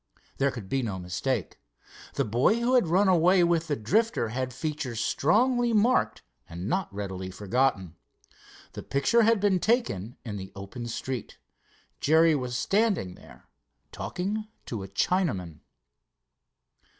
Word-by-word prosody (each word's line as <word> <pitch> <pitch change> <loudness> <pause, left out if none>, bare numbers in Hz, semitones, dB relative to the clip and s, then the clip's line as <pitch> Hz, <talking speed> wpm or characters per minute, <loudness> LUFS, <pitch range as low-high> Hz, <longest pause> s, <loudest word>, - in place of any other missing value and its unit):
There 140 +1 +3
could 115 -7 -7
be 135 +6 0
no 105 -6 -3
mistake. 90 -1 -3 0.6
The - - +1
boy 125 - +2
who 240 +2 +1
had 245 -9 +4
run 190 +5 +3
away 180 0 +5
with 170 -1 +1
the 145 - 0
Drifter 200 - +1
had 130 +2 -3
features 145 -4 -4
strongly 240 - +2
marked 230 +4 +2 0.3
and 85 +2 -6
not 185 - -1
readily 95 -2 -5
forgotten. 100 -2 0 0.8
The - - -6
picture 140 +12 +2
had 225 -1 +4
been 195 -2 +2
taken 125 - 0
in 105 -3 -5
the 95 -1 -8
open 100 +5 -7
street. 125 +1 -5 0.6
Jerry 160 +2 +4
was 125 -4 -2
standing 195 - +1
there - - -16 0.4
talking 210 +4 -4 0.2
to 115 -4 -5
a 95 - -6
Chinaman. 95 - -1
140 Hz, 140 wpm, -27 LUFS, -, 0.8 s, away